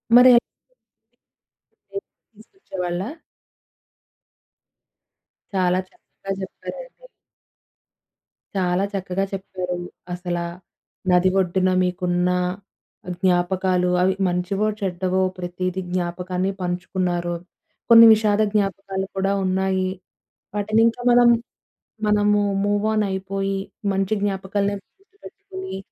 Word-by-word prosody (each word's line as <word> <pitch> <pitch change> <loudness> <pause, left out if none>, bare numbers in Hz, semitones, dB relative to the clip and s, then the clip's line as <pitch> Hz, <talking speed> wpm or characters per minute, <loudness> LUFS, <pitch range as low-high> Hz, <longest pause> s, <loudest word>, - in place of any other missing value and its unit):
మరె 250 0 +9 1.5
లేపి 395 - -6 0.3
తీసుకొచ్చేవాళ్ళా? 190 - -5 2.5
చాలా 185 -1 +2
చక్కగా 195 - -10
చెప్పారండి. - - -9 1.5
చాలా 180 0 +1
చక్కగా 190 0 -2
చెప్పారండి. 180 -2 -4 0.2
అసలా, 175 -1 -3 0.7
నది 180 +1 +5
ఒడ్డున 185 0 +2
మీకున్న 180 0 0 0.9
జ్ఞాపకాలు 180 0 +2
అవి 190 +1 +3
మంచివో, 180 +4 0
చెడ్డవో 185 0 0 0.2
ప్రతీదీ 180 +1 -3
జ్ఞాపకాన్ని 180 +1 -1
పంచుకున్నారు. 175 -1 -1 0.5
కొన్ని 230 0 +10
విషాద 215 -1 +2
జ్ఞాపకాలు 195 -2 -1
కూడా 195 +1 +1
ఉన్నాయి. 190 0 +1 0.7
వాటినింకా 225 +3 +2
మనం, 240 0 +6 0.8
మనము 210 0 +3 0.2
మూవ్ 205 +1 +1
ఆన్ 215 -1 +2
అయిపోయి, 195 +1 -2 0.3
మంచి 195 +2 0
జ్ఞాపకాలనే 200 0 -1 0.2
గుర్తుపెట్టుకొని 390 - -10
190 Hz, 80 wpm, -22 LUFS, 180-205 Hz, 2.5 s, కొన్ని